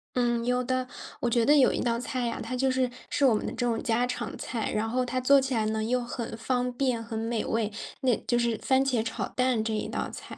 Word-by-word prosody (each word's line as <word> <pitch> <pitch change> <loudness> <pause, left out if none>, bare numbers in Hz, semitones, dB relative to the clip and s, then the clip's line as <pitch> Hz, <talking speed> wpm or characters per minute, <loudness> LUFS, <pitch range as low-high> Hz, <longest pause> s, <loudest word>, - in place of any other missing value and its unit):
嗯， 240 -1 +1
有 250 +1 +1
的， 255 0 -1 0.3
我 240 - 0
觉 235 -1 +2
得 295 +4 +6
有 275 -3 +6
一 - - -2
道 235 -1 0
菜 250 0 -2
呀， 235 - -2
它 240 +3 -4
就 265 +1 +2
是， 255 -1 +1 0.2
是 - - 0
我 255 - +6
们 - - -2
的 - - -3
这 245 - -1
种 230 -2 0
家 240 +1 +1
常 250 - -4
菜， 230 -3 -3
然 220 +1 0
后 255 +1 0
它 255 +1 -1
做 275 +2 +6
起 265 -1 -2
来 220 -2 +1
呢， 220 0 -1
又 250 +3 +1
很 235 -1 -5
方 250 +2 -1
便， 245 -2 0
很 225 -1 -5
美 225 0 -1
味， 220 -2 0 0.3
那 255 -3 +3
就 240 - +2
是 235 -2 +1
番 265 0 +3
茄 250 -5 +1
炒 225 - -3
蛋 250 -3 +1
这 220 - -2
一 215 - -2
道 - - -3
菜。 - - -9
245 Hz, 280 characters per minute, -28 LUFS, 225-255 Hz, 0.3 s, 得